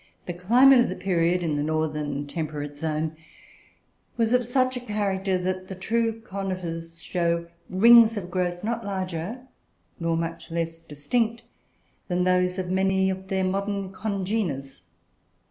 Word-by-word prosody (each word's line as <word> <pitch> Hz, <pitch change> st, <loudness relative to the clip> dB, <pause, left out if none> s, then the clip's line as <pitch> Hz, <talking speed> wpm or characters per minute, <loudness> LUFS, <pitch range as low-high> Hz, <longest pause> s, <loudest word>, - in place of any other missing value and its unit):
The 175 Hz, -, -4 dB
climate 245 Hz, +9 st, +6 dB
of 240 Hz, -, +3 dB
the 185 Hz, -, -3 dB
period, 180 Hz, -2 st, +1 dB
in 155 Hz, -3 st, 0 dB
the -, -, 0 dB
northern 150 Hz, -2 st, -1 dB
temperate 145 Hz, -1 st, -4 dB
zone, 155 Hz, +1 st, -2 dB, 1.0 s
was 230 Hz, 0 st, +2 dB
of 250 Hz, 0 st, +4 dB
such 255 Hz, +2 st, +1 dB
a -, -, -2 dB
character 200 Hz, -4 st, -1 dB
that 185 Hz, +1 st, -3 dB
the 190 Hz, -, -6 dB
true 225 Hz, +4 st, 0 dB
conifers 180 Hz, -5 st, -5 dB
show 170 Hz, -1 st, 0 dB, 0.2 s
rings 225 Hz, +3 st, +7 dB
of 180 Hz, -3 st, -5 dB
growth, 175 Hz, 0 st, -1 dB
not 230 Hz, +1 st, -2 dB
larger, 190 Hz, +3 st, -4 dB, 0.6 s
nor 165 Hz, -1 st, 0 dB
much 165 Hz, 0 st, -4 dB
less 165 Hz, 0 st, -3 dB
distinct, 215 Hz, +10 st, -1 dB, 0.6 s
than 180 Hz, -1 st, +1 dB
those 180 Hz, 0 st, +2 dB
of 185 Hz, -1 st, -3 dB
many 190 Hz, 0 st, +2 dB
of 190 Hz, 0 st, -6 dB
their 190 Hz, 0 st, 0 dB
modern 195 Hz, +1 st, -1 dB
congeners. 190 Hz, -, -3 dB
185 Hz, 145 wpm, -25 LUFS, 165-205 Hz, 1.0 s, rings